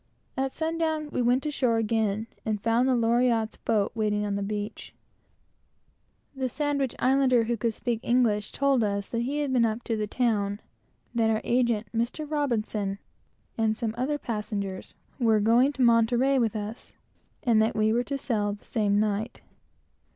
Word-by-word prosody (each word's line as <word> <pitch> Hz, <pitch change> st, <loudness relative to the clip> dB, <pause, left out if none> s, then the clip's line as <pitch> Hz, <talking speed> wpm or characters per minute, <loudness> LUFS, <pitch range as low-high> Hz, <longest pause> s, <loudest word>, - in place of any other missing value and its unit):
At 265 Hz, 0 st, -1 dB
sun 325 Hz, +2 st, -3 dB
down 315 Hz, -2 st, -1 dB
we -, -, -1 dB
went 245 Hz, +4 st, +2 dB
ashore 255 Hz, -6 st, +1 dB
again, 220 Hz, -1 st, 0 dB, 0.2 s
and 215 Hz, -2 st, -1 dB
found 230 Hz, +4 st, +2 dB
the 255 Hz, -, +3 dB
Loriotte's 230 Hz, -1 st, +2 dB
boat 210 Hz, -3 st, 0 dB
waiting 210 Hz, -2 st, 0 dB
on 205 Hz, -, -2 dB
the 200 Hz, -, -2 dB
beach. 205 Hz, +1 st, -5 dB, 1.4 s
The 260 Hz, -1 st, -2 dB
Sandwich 280 Hz, -1 st, -1 dB
Islander 255 Hz, -2 st, +3 dB
who 235 Hz, +1 st, -1 dB
could 230 Hz, 0 st, -2 dB
speak 240 Hz, -3 st, -2 dB
English, 230 Hz, -5 st, +1 dB
told 275 Hz, -4 st, +2 dB
us 200 Hz, -1 st, -2 dB
that 230 Hz, -, -1 dB
he 280 Hz, +5 st, -1 dB
had 280 Hz, -3 st, -1 dB
been 245 Hz, -2 st, +4 dB
up 225 Hz, +1 st, -1 dB
to 230 Hz, -, -1 dB
the 215 Hz, -1 st, -2 dB
town; 205 Hz, -4 st, 0 dB, 0.5 s
that 225 Hz, -2 st, +2 dB
our 220 Hz, -1 st, +2 dB
agent, 235 Hz, -3 st, +1 dB
Mr. 235 Hz, +7 st, -1 dB
R, 220 Hz, -9 st, -1 dB, 0.6 s
and 220 Hz, -1 st, +1 dB
some 225 Hz, -3 st, -2 dB
other 265 Hz, +5 st, -1 dB
passengers, 210 Hz, -6 st, -4 dB, 0.2 s
were 225 Hz, -3 st, +3 dB
going 235 Hz, +6 st, +4 dB
to 270 Hz, -, 0 dB
Monterey 240 Hz, +3 st, +4 dB
with 225 Hz, -3 st, 0 dB
us, 215 Hz, +2 st, -6 dB, 0.5 s
and 225 Hz, -3 st, +4 dB
that 220 Hz, -, +1 dB
we 215 Hz, 0 st, +2 dB
were 240 Hz, +1 st, +1 dB
to 280 Hz, -, -3 dB
sail 210 Hz, -6 st, -1 dB
the 205 Hz, -, -12 dB
same 205 Hz, -2 st, +1 dB
night. 215 Hz, +2 st, -1 dB
230 Hz, 170 wpm, -27 LUFS, 215-255 Hz, 1.4 s, been